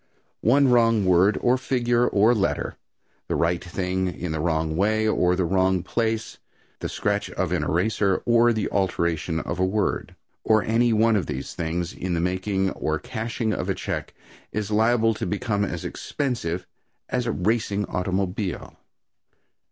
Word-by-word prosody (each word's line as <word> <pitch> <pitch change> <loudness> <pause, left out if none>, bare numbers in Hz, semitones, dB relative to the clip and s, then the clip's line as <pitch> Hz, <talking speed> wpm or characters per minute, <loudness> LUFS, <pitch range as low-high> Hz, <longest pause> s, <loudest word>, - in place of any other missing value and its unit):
One 135 +5 +4
wrong 115 -4 +4
word, 95 +3 +4
or 125 +1 +3
figure, 120 -2 +1
or 110 +4 +4
letter 100 -4 -1 0.5
the - - -1
right 85 +1 +1
thing 95 +1 -2
in 90 -1 -4
the 80 - -2
wrong 80 -1 0
way 110 +4 +2
or 90 -4 +2
the 90 -1 0
wrong 95 0 +2
place 110 +2 -2 0.4
the - - -4
scratch - - -1
of - - -2
an - - +1
eraser 95 +2 +1
or 120 0 +5
the 110 -2 -1
alteration 85 -4 0
of - - -4
a - - +3
word 100 +3 -1 0.3
or 110 -1 +3
any 115 +2 +2
one 110 +1 +3
of 95 -7 0
these 65 +2 -5
things, 85 +1 -3
in 90 -1 -3
the - - 0
making 95 +2 0
or 80 0 -2
cashing 115 0 -3
of - - -3
a - - +1
check, - - -4 0.4
is 105 -1 -3
liable 115 +1 +3
to 110 - -4
become 105 0 -1
as 100 - -4
expensive 90 - -3 0.4
as 125 -1 -1
a - - +1
racing 105 0 0
automobile. 95 +1 -3
100 Hz, 160 wpm, -24 LUFS, 90-115 Hz, 0.5 s, or